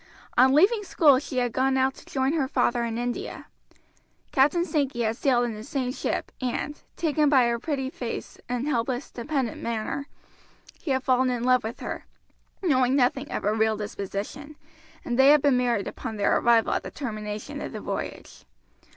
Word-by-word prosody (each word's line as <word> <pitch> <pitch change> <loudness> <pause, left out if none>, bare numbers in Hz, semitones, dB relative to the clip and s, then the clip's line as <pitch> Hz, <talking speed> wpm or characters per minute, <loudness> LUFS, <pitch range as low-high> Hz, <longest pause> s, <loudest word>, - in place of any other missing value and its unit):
On 260 +2 +6
leaving 415 +7 +4
school 295 -8 +4
she 270 -2 -6
had 245 -2 +1
gone 265 +1 +2
out 265 0 +2
to - - -15
join 265 +1 0
her 295 -5 +1
father 240 -2 +1
in 230 -1 -2
India. 245 0 -4 0.9
Captain 295 +6 +3
Sankey 275 -8 -1
had 220 0 0
sailed 245 -1 +2
in 235 - -3
the 215 0 -8
same 255 +1 -2
ship - - -3
and, 255 +4 -3 0.2
taken 305 -2 +2
by 265 -4 +5
her 235 0 0
pretty 265 -1 -2
face 240 -4 -6
and 250 +3 -2
helpless, 250 -1 -1
dependent 260 -1 -2
manner, 235 +5 -3 0.7
he - - -6
had 265 -1 +1
fallen 255 -1 +3
in 245 -1 -2
love 255 -1 +3
with 220 +2 -6
her, - - -5 0.6
knowing 260 -6 +3
nothing 270 +2 +1
of - - -3
her 210 - +2
real 220 0 +2
disposition, 210 +8 -5 0.5
and 245 +1 -2
they 265 - +7
had 295 0 +6
been 285 -3 +4
married 240 -5 +1
upon 220 - -6
their 200 - +2
arrival 230 -1 +3
at - - 0
the - - -7
termination 215 -5 -5
of - - -5
the - - -6
voyage. - - -6
255 Hz, 185 wpm, -26 LUFS, 235-280 Hz, 0.9 s, they